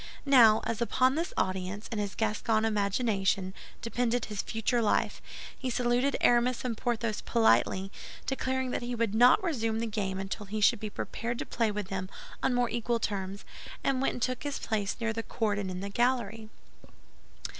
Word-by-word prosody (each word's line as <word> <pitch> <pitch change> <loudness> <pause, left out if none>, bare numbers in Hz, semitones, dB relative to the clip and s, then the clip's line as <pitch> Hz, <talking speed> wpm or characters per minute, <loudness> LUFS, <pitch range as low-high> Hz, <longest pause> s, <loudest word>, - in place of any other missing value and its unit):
Now, 235 -6 +7
as 230 0 -3
upon 255 +2 +3
this 330 +4 -2
audience, 185 +2 -2
in 220 - -2
his 205 -2 -3
Gascon 220 0 +1
imagination, 200 -3 0 0.3
depended 240 0 0
his 210 -2 -3
future 225 +2 0
life, 215 - +1 0.3
he 260 - -4
saluted 245 +2 +1
Aramis 245 +1 +3
and 240 -2 -1
Porthos 230 -2 -1
politely, 195 -4 +2 0.3
declaring 260 -1 -1
that - - -2
he 245 0 -3
would 230 -3 0
not 245 - +6
resume 230 -11 0
the 230 - -1
game 205 -4 -2
until 195 +1 -5
he 215 +2 -3
should 215 +2 +4
be 215 - -4
prepared 235 +3 -4
to - - -4
play 230 -2 0
with 205 -2 -4
them 190 -1 -3 0.3
on 260 -2 +1
more 245 0 +2
equal 235 0 0
terms, 200 -2 -3 0.4
and 265 -1 +1
went 270 - +1
and 245 - -7
took 255 +3 -1
his 290 -2 -3
place 210 -3 -2
near 230 -1 -1
the 225 - -2
cord 215 -2 -1
and 195 -2 -3
in 180 0 -5
the 200 - -4
gallery. 225 -1 0
225 Hz, 180 wpm, -29 LUFS, 205-245 Hz, 0.4 s, Now